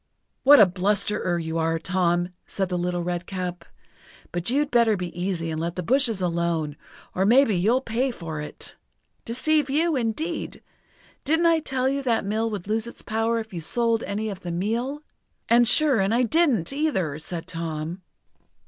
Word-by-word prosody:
"What 285 +1 +8
a 210 - +9
blusterer 190 0 0
you 165 0 -3
are, 165 0 +1
Tom!" 175 0 0 0.2
said 190 -2 -2
the 180 - -1
Little 175 0 -2
Redcap, 180 0 -4 0.7
"but 175 +4 -2
you'd 285 +3 +1
better 230 -3 +3
be 180 -2 -6
easy 175 -3 -2
and 155 - -3
let 170 +1 -3
the 180 - -3
bushes 235 - +2
alone, 170 -3 -1 0.4
or 185 - 0
maybe 230 +1 +4
you'll 220 +9 +2
pay 250 +2 -1
for 165 -10 -6
it! 150 - -9 0.5
Deceive 285 +5 +1
you, 315 +3 +2
indeed! 270 +8 -3 0.6
Didn't 320 +4 +2
I 330 -1 +4
tell 265 -4 -1
you 275 +1 0
that 235 -6 0
mill 220 +3 -1
would 200 -4 -6
lose 220 +2 -1
its 235 - -9
power 225 +1 0
if 220 -2 -6
you 170 - -4
sold 230 +6 0
any 210 +3 -3
of 195 - -7
the 175 - -7
meal?" 230 - -2 0.4
"And 235 0 +5
sure 275 0 +6
and 195 +4 +1
I 250 - +3
didn't, 270 - +1
either," 190 - -1
said 165 +1 -6
Tom. 165 +1 -5
210 Hz, 175 wpm, -24 LUFS, 175-250 Hz, 0.7 s, a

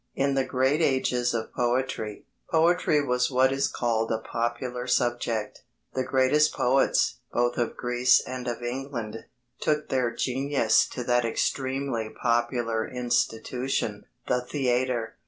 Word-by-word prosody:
In 140 0 +1
the 135 -1 +2
great 130 +4 +1
ages 130 -4 +1
of 110 -1 -4
poetry, 120 -3 -1 0.2
poetry 165 -2 +3
was 125 -1 +1
what 130 0 +3
is 135 +1 +1
called 115 -2 -1
a 110 - +1
popular 120 +2 -3
subject. 120 -3 -1 0.3
The 130 - 0
greatest 135 +4 +3
poets, 130 +2 +2
both 120 0 +1
of 120 - -1
Greece 125 0 +3
and 125 -1 -6
of 120 0 -4
England, 120 -3 -5 0.3
took 150 0 0
their 130 -3 +1
genius 135 +4 +2
to 125 - -5
that 120 0 +2
extremely 130 0 -1
popular 120 -1 0
institution, 125 -2 -1 0.2
the 125 - +1
theatre. 125 -3 -1
125 Hz, 130 wpm, -26 LUFS, 120-135 Hz, 0.3 s, poetry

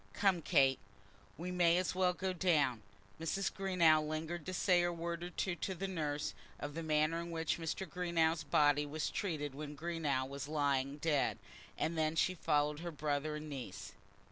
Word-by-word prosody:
Come, 190 -4 +2
Kate, 135 -3 +4 0.6
we 175 +3 -4
may 175 -1 +4
as 185 - 0
well 185 -1 +2
go 185 +1 -2
down." 155 - +2 0.4
Mrs. 190 +5 -1
Greenow 175 -5 +4
lingered 155 +2 -4
to - - -2
say 180 -1 +4
a 175 0 +1
word 170 0 -4
or 175 - -4
two 185 +1 -2
to 190 - -3
the 195 +3 -3
nurse, 150 -5 -2 0.3
of 145 0 -5
the 165 - -4
manner 155 +1 +2
in 170 - -6
which 165 0 -1
Greenow's 165 -1 0
body 145 0 +3
was 155 +1 -2
treated 150 -7 -2
when 150 +1 -6
Greenow 155 -5 -1
was 140 0 -6
lying 140 -2 0
dead, 150 -2 +1 0.4
and 165 - -1
then 155 0 +1
she 180 +3 +3
followed 150 -3 +1
her 170 +1 -4
brother 150 -1 -1
and 150 0 -6
niece. 100 -8 -6
160 Hz, 175 wpm, -35 LUFS, 145-175 Hz, 0.6 s, Kate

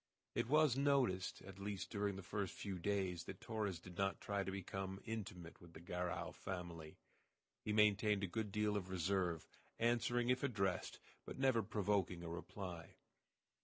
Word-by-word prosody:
It - - +1
was 150 -3 +6
noticed, 135 -10 +2
at 95 0 -10
least 100 -1 -3
during 100 -2 0
the 95 - -6
first 100 +1 -2
few 95 -3 -4
days, 95 -2 0
that 95 - -6
Torres 105 -5 -1
did 90 +1 -10
not 95 0 +1
try 100 -1 0
to 95 - -3
become 95 0 -3
intimate 95 -7 -5
with 85 -1 -13
the 80 - -9
Garral 90 +1 -2
family. 85 -5 -5 0.7
He 105 - -1
maintained 105 -1 +4
a - - +4
good 105 +2 -2
deal 105 0 +2
of 95 -3 -2
reserve, 90 -2 +1 0.3
answering 120 +1 +2
if 125 - +2
addressed, 95 -9 0 0.3
but - - -7
never 130 -3 +4
provoking 100 -4 +1
a 85 - -4
reply. 85 0 -6
95 Hz, 165 wpm, -41 LUFS, 90-105 Hz, 0.7 s, was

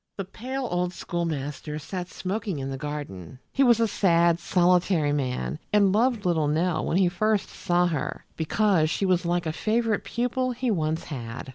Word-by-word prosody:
The 195 - -3
pale 255 +6 -5
old 180 0 0
schoolmaster 150 -4 -3
sat 180 +4 -5
smoking 195 0 -3
in 135 0 -4
the - - -3
garden. 135 - -6
He 275 - 0
was 240 -4 +5
a 230 - +3
sad, 170 -4 +3
solitary 175 -4 +2
man, 135 +1 -2
and 200 -2 +4
loved 230 -1 +2
little 160 -4 +2
Nell 160 +2 +1
when 170 - +1
he 190 -2 +4
first 210 +3 0
saw 175 -1 +1
her, 160 -6 -3
because 165 0 +2
she 195 - 0
was 180 -2 +2
like 175 0 0
a 160 - -1
favorite 225 +3 0
pupil 250 +1 -1
he 245 0 -1
once 160 -3 -1
had. 120 -3 -6
175 Hz, 175 wpm, -26 LUFS, 155-210 Hz, -, was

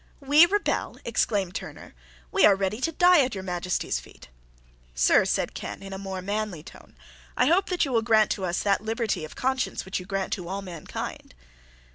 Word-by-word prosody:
"We 295 +4 +6
rebel!" 410 +3 -1
exclaimed 205 -5 0
Turner; - - -8 0.4
"we - - +2
are 200 - +7
ready 195 +4 -2
to 330 - 0
die 355 -1 +5
at 255 -4 -3
your 190 - -5
Majesty's 180 -1 -2
feet." - - -16 0.7
"Sir," - - +4
said - - -1
Ken, - - -7
in 195 0 -8
a 190 - -6
more 190 -1 -5
manly 205 -5 -3
tone, - - -15 0.4
"I 250 - +4
hope 350 +7 +3
that 360 -3 +1
you 275 - -4
will 230 -2 +2
grant 220 -2 +3
to 190 - -2
us 175 0 -1
that 200 -1 +2
liberty 220 -5 -2
of - - -12
conscience 265 0 -1
which 190 - -3
you 180 - -10
grant 195 -1 -2
to 180 -2 -5
all 195 +2 -4
mankind." 170 - -7
200 Hz, 195 wpm, -26 LUFS, 190-255 Hz, 0.7 s, are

